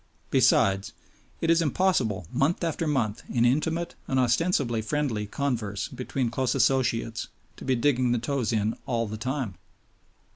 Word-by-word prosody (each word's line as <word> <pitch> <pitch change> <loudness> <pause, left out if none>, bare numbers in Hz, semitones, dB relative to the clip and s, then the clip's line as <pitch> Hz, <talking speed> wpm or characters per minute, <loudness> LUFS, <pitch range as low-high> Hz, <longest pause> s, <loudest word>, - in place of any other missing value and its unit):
Besides, 95 0 +3 0.5
it 165 - +3
is 165 0 +4
impossible 135 - +1
month 145 +7 +1
after 165 0 -1
month 120 -8 0
in 120 -1 +2
intimate 160 +7 +1
and 130 - +1
ostensibly 125 -2 +2
friendly 115 -4 -1
converse 110 -6 -2
between 125 -1 -2
close 130 +1 0
associates, 115 -3 +1 0.3
to - - -9
be 130 -1 +2
digging 125 0 +2
the 120 - +2
toes 125 0 -1
in 110 0 0
all 115 -2 0
the 110 0 -5
time. 125 -4 -3
125 Hz, 145 wpm, -27 LUFS, 115-145 Hz, 0.5 s, is